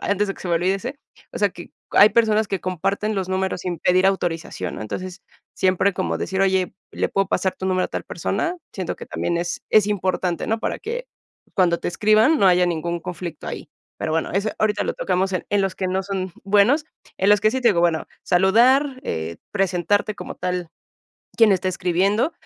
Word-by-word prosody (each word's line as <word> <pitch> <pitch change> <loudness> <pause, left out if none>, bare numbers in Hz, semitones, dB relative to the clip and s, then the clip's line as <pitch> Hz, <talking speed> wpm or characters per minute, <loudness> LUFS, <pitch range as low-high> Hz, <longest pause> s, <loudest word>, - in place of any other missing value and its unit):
antes 205 +1 +1
de 195 - -2
que - - -16
se 185 - -5
me 170 - +2
olvide 180 +3 +2
ese, 250 +8 -6 0.3
o - - -5
sea, 205 -1 +2
que 175 -1 -11 0.2
hay 205 - +7
personas 220 -2 +2
que 195 -2 -2
comparten 195 +4 -1
los 190 -2 -2
números 190 -1 -1
sin 175 -3 -3
pedir 185 +2 +3
autorización, 165 - -2
¿no? - - -7
Entonces, 180 - -6 0.3
siempre 190 +1 +2
como 185 - -1
decir: 190 0 -2
"Oye, 190 -1 +2 0.2
le - - -1
puedo 195 -1 0
pasar 190 - 0
tu 190 - -4
número 185 -1 +1
a - - -21
tal - - -5
persona". 350 +2 -2 0.2
Siento 185 -3 -4
que - - -8
también 170 - -2
es 170 0 -3
es 215 -2 +5
importante, 185 -3 -1
¿no? 225 - +1
Para - - -2
que 485 +3 -5 0.5
cuando 170 -3 +3
te - - -2
escriban, 215 - +4
no 195 - +4
haya 180 0 +4
ningún 170 0 -2
conflicto 175 -1 -7
ahí. - - -6 0.3
Pero 155 - -2
bueno, 165 - 0
eso 200 +4 0
ahorita 215 -1 +1
lo - - -2
tocamos 190 +1 0
en 185 - -2
en 205 - +3
los 195 -1 -1
que 190 - -2
no 190 +1 0
son 190 -1 -4
buenos, 210 +10 +4 0.3
en 190 - +2
los 205 -1 +5
que 215 +1 +3
sí 260 - -1
te 240 - +4
digo, 185 -6 +3
bueno, 170 -2 +1 0.2
saludar, 255 +9 +4
eh, 80 +1 -3 0.2
presentarte 195 +2 +1
como - - -7
tal 180 -1 -3 0.7
quién 225 -3 +6
está 185 0 0
escribiendo, 190 - +1
190 Hz, 210 wpm, -22 LUFS, 180-210 Hz, 0.7 s, hay